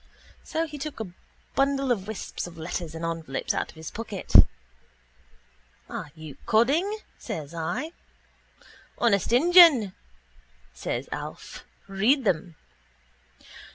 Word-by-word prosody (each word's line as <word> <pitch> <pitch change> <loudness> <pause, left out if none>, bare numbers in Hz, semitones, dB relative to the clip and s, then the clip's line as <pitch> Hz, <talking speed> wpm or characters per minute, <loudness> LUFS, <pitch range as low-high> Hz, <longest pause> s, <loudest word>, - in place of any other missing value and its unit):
So 325 +1 -1
he 300 -2 -8
took 300 -2 -5
a 210 -5 -5 0.4
bundle 275 -1 +1
of 200 -5 -1
wisps 220 -4 -5
of 170 -1 -12
letters 165 0 -5
and 165 +1 -4
envelopes 165 -5 -2
out - - -2
of - - -14
his 160 0 -8
pocket. 215 -4 -6 1.5
—Are - - -6
you 155 -3 -10
codding? 275 - +3 0.3
says 155 0 -6
I. 170 - -3 1.1
—Honest 200 -5 +2
injun, 300 - +7 0.8
says - - -4
Alf. - - -7 0.2
Read 215 +8 +2
them. 175 -4 0
210 Hz, 115 wpm, -26 LUFS, 165-275 Hz, 1.5 s, injun